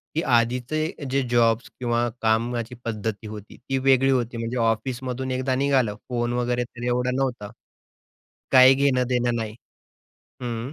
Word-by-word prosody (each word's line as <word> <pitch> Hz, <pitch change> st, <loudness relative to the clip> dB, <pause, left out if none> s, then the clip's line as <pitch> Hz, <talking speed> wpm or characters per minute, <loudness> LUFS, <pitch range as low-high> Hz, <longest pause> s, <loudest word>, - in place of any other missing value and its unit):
की 160 Hz, -, +1 dB
आधीचे 125 Hz, +6 st, 0 dB
जे 135 Hz, +1 st, +2 dB
जॉब्स 115 Hz, -1 st, +2 dB
किंवा 120 Hz, -1 st, 0 dB
कामाची 115 Hz, +2 st, 0 dB
पद्धती 110 Hz, -2 st, -3 dB
होती, 105 Hz, -1 st, -10 dB
ती 135 Hz, +1 st, -3 dB
वेगळी 135 Hz, 0 st, +3 dB
होती 120 Hz, -3 st, 0 dB
म्हणजे 115 Hz, +2 st, -3 dB
ऑफिसमधून 125 Hz, +3 st, -1 dB
एकदा 130 Hz, 0 st, 0 dB
निघालं, 130 Hz, -5 st, +1 dB
फोन 120 Hz, -1 st, -1 dB
वगैरे 125 Hz, 0 st, 0 dB
तर 120 Hz, 0 st, -10 dB
एवढा 125 Hz, +1 st, +1 dB
नव्हता. 125 Hz, -6 st, -2 dB, 1.0 s
काय 130 Hz, 0 st, +8 dB
घेणं 135 Hz, -2 st, +2 dB
देणं 120 Hz, -1 st, +1 dB
नाही. 110 Hz, -2 st, -4 dB, 0.9 s
हं. 120 Hz, +2 st, -4 dB
120 Hz, 140 wpm, -24 LUFS, 115-130 Hz, 1.0 s, काय